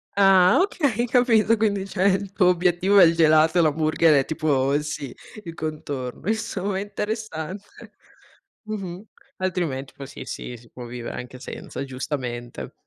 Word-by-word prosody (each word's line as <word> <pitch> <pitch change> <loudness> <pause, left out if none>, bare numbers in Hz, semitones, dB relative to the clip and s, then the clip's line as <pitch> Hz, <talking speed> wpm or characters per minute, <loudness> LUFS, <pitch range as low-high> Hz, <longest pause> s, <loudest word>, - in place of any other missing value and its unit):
Ah 195 - +6
okay, 280 - 0
capito, 230 -3 +3
quindi 200 -3 0
cioè 190 -1 -1
il 195 0 +1
tuo 195 -2 +3
obiettivo 180 +2 +3
è 185 - +9
il 165 - +6
gelato 160 0 +4
e - - +6
l'hamburger 155 +1 +3
è - - -5
tipo 140 -4 0
il 145 +1 +1
sì, 150 -4 -6 0.3
il 165 -2 -7
contorno, 145 -3 -5
insomma 210 -3 -2
è - - -2
interessante. 205 -3 -6 0.7
Mh-mh. 195 -3 -6 0.3
Altrimenti 170 -8 -2
poi, 140 - -8
sì, - - -9
sì, 125 - -6
si 115 0 -19
può 125 -1 -9
vivere 120 0 -6
anche 125 +1 -8
senza, 135 - -7
giustamente. 130 -3 -5
175 Hz, 155 wpm, -23 LUFS, 145-200 Hz, 0.7 s, è